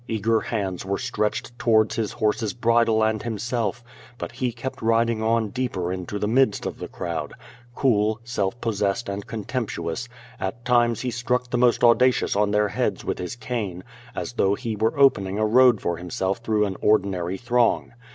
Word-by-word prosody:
Eager 110 +1 +1
hands 95 -6 -3
were 100 +1 -2
stretched 120 -1 -2
towards 110 -2 +3
his 115 0 -2
horse's 110 -1 0
bridle 115 -2 +3
and 110 -1 +1
himself, 115 +1 -2 0.3
but - - -5
he 125 -2 -2
kept 120 +3 -6
riding 115 0 +2
on 110 -1 +1
deeper 100 -8 -2
into 95 +2 -5
the 105 - -1
midst 125 -1 +2
of - - -4
the - - -5
crowd; - - -4 0.4
cool, 110 -4 +2
self 115 -2 -2
possessed 105 -1 -1
and 100 0 -5
contemptuous, 110 -2 -4 0.3
at 115 +6 -4
times 120 -2 +3
he 125 - -2
struck 125 +1 -1
the 125 - +1
most 120 -1 +3
audacious 125 0 +4
on 105 0 +2
their 105 0 +2
heads - - -2
with - - -2
his 90 +6 -4
cane, 110 -7 -4 0.3
as - - -4
though 100 +1 +2
he 115 -1 -4
were 110 +4 0
opening 100 -8 +4
a 110 - +2
road 125 0 +5
for 85 -1 -2
himself 95 +3 -2
through 110 -2 +1
an 95 -2 -4
ordinary 95 -3 +1
throng. 120 +1 +1
110 Hz, 175 wpm, -24 LUFS, 100-120 Hz, 0.4 s, road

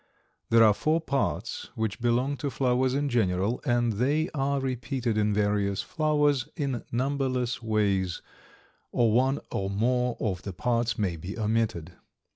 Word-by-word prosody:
There 115 0 +6
are 110 -2 +6
four 155 +9 +1
parts 140 -4 -2
which 110 0 -2
belong 125 +4 +1
to 145 - -2
flowers 130 -1 +1
in 145 +1 0
general, 105 -2 0
and 120 -3 +2
they 145 - +1
are 140 -1 0
repeated 130 -2 -2
in 105 0 +2
various 100 -1 +1
flowers 150 -4 +1
in 135 -7 -2
numberless 130 -1 -1
ways, 100 -5 0 0.7
or 115 -2 +3
one 130 +4 +3
or 95 0 -2
more 125 +4 0
of 95 -5 -2
the 100 - -6
parts 115 +2 0
may 95 -6 -1
be 90 +7 -7
omitted. 110 -6 -1
120 Hz, 145 wpm, -27 LUFS, 105-135 Hz, 0.7 s, There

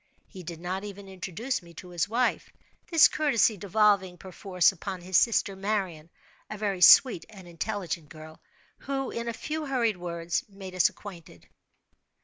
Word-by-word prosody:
He 190 - -11
did 170 -1 -8
not 185 +3 -4
even 200 -1 -9
introduce 190 +7 -4
me 170 -1 -16
to 180 - -10
his 175 +2 -2
wife—this 255 +6 +1
courtesy 275 -7 +2
devolving, 200 -1 +2
per 190 - -11
force, 180 -1 +2
upon 190 0 -7
his 185 +1 -5
sister 205 -1 +3
Marian—a 190 -1 -5
very 200 -3 -2
sweet 180 -2 +7
and 195 -5 -13
intelligent 175 -3 -4
girl, 155 0 -12 0.4
who, 270 -1 -3
in 235 0 -5
a - - -1
few 305 +6 -5
hurried 235 -7 0
words, 170 -1 -3
made 195 -2 -10
us 185 -1 +4
acquainted. 170 - -13
190 Hz, 150 wpm, -27 LUFS, 175-215 Hz, 0.4 s, sweet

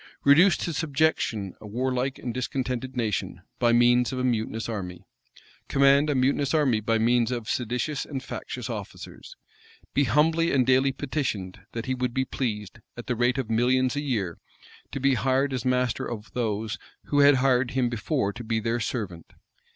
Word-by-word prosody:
Reduce 165 +7 +6
to 170 - -3
subjection 145 - 0
a 105 - -9
warlike 125 +4 -1
and 120 - -5
discontented 125 0 -3
nation, 110 -5 -2 0.2
by 120 -1 +3
means 120 +1 +4
of 130 - -4
a 125 - -1
mutinous 115 -2 -1
army? 95 -6 -6 0.6
Command 140 +2 +4
a 145 - +1
mutinous 140 +3 +1
army 135 -8 +3
by 115 +1 +1
means 120 +1 +2
of 120 -3 -4
seditious 125 +5 -2
and 135 -3 -6
factious - - -6
officers? - - -8 0.6
Be 140 - +3
humbly 160 +7 +2
and 130 -3 +3
daily 130 +1 +4
petitioned, 130 -10 -3
that 115 0 -4
he 130 - -1
would 125 -1 -2
be 130 0 +1
pleased, 110 -5 -4 0.2
at 120 - -7
the 125 - -1
rate 120 +3 +1
of 125 -4 -3
millions 125 +3 +2
a 145 - -1
year, 105 - -2 0.5
to 135 - -4
be 135 +1 +3
hired 135 +2 +1
as 125 -2 -3
master 125 -2 0
of 110 -2 -7
those 110 -2 -2 0.2
who 145 - 0
had 145 0 +7
hired 125 -1 +2
him 130 -2 +1
before 120 -2 -1
to 120 - -8
be 110 0 -1
their 115 +2 -1
servant? 105 -8 -4
125 Hz, 175 wpm, -26 LUFS, 115-135 Hz, 0.6 s, had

